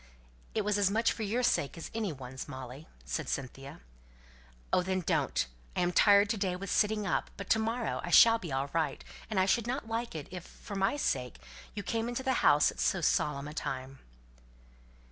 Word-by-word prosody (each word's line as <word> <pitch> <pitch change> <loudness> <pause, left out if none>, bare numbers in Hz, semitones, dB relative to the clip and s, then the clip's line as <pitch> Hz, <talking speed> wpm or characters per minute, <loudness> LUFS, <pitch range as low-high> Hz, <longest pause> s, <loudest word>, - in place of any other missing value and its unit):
"It 215 -2 0
was 205 0 +1
as 200 -2 +4
much 225 +3 +2
for - - -5
your 225 +4 0
sake 160 - +1
as 165 - -7
any 220 -4 -1
one's, 130 -2 -8
Molly," 130 +3 -8 0.2
said 60 -2 -3
Cynthia. 135 - -5 0.9
"Oh, - - +5
then, 185 +1 -1
don't! 160 -5 +1 0.3
I - - +1
am 175 0 +2
tired 200 +2 +6
to 225 - -1
day 190 -3 -1
with 195 +2 -5
sitting 210 -1 +2
up; 180 - 0
but 200 - -5
to 220 - +5
morrow 225 +1 -1
I 175 - -4
shall 230 +6 +7
be 170 -7 -7
all 135 +1 -2
right; 165 -1 -1 0.3
and 215 -4 0
I 185 - +4
should 230 +4 +1
not 255 -1 -3
like 230 -2 -3
it, 150 -3 -5
if, 180 -2 -6
for 200 - -10
my 195 +8 +1
sake, 125 - -1 0.4
you 205 - -4
came 225 +4 -1
into 245 +2 -3
the 260 - +1
house 145 0 +5
at - - -13
so 190 - +2
solemn 145 -3 +1
a 150 - -7
time." 135 -2 -5
190 Hz, 205 wpm, -31 LUFS, 145-220 Hz, 0.9 s, shall